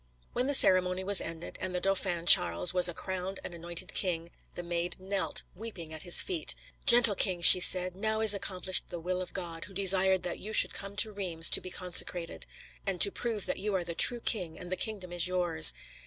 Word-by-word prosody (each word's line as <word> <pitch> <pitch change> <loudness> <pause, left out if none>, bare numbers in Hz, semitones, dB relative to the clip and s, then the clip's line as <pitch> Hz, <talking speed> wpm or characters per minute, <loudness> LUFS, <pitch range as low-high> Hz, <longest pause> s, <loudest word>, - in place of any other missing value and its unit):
When 250 +2 -3
the 285 - +3
ceremony 185 -4 +1
was 200 0 +3
ended, 165 0 -10
and 185 -1 -6
the - - -3
Dauphin 185 -3 -4
Charles 85 - +5
was 180 -1 +5
a - - -8
crowned 190 0 -7
and - - -10
anointed 170 +2 -6
king, 170 -3 -3 0.2
the 175 - -8
Maid 175 +1 -6
knelt 190 +1 -4
weeping 180 -6 -10
at 155 - -9
his 175 -2 +4
feet. 350 -4 -5 0.3
"Gentle 235 -3 +5
king," 185 -2 0
she 180 - +10
said, 180 0 +3
"now 220 +2 -3
is 220 -2 +6
accomplished 185 -2 -4
the 175 - -9
will 180 +2 -5
of 185 - -9
God, 170 -3 -8
who 195 - -17
desired 190 -1 +1
that 175 - -7
you 215 +2 -10
should - - +4
come 200 0 -10
to 215 +1 0
Reims 180 -5 +1
to - - +2
be 185 - -10
consecrated, 180 -1 -1 0.4
and 195 -3 -5
to 200 - +4
prove 225 -3 -5
that - - -5
you 205 0 -4
are 180 - -3
the 170 0 -8
true 240 +7 +3
king 180 -10 -3
and 180 0 -12
the - - -2
kingdom 190 -4 -6
is 175 0 +1
yours." 175 - +3
185 Hz, 215 wpm, -27 LUFS, 175-200 Hz, 0.4 s, she